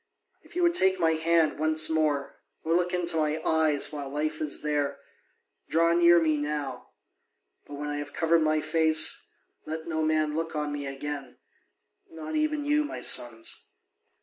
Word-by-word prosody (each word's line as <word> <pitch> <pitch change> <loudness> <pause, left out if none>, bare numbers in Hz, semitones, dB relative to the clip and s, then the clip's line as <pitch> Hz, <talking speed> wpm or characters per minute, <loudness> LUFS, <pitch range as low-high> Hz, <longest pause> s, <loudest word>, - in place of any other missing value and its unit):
If - - -19
you 355 - +1
would 345 0 +4
take 190 - +3
my 165 -2 +3
hand 160 -1 +2
once 155 0 +2
more, 155 -3 -1 0.2
or 165 - 0
look 180 0 +1
into 175 -2 -1
my 155 0 0
eyes 155 -2 +2
while 145 -2 -5
life 155 +2 -3
is 150 -2 -3
there, 145 -2 -1 0.7
draw 165 +1 +3
near 170 0 +6
me 155 -2 +1
now; 145 -3 -4 0.8
but 145 - -8
when 145 +1 -5
I 145 - -3
have 145 0 -6
covered 165 +1 +2
my 155 0 +2
face, 160 -1 +1 0.4
let 160 +1 -5
no 160 -1 -1
man 155 -1 +1
look 165 0 -3
on 150 -1 -2
me 145 -1 -4
again, 140 0 -6 0.7
not 160 -1 -7
even 305 -1 0
you, 300 +1 +2
my 295 - -6
sons. 115 -2 0
155 Hz, 170 wpm, -27 LUFS, 150-165 Hz, 0.8 s, near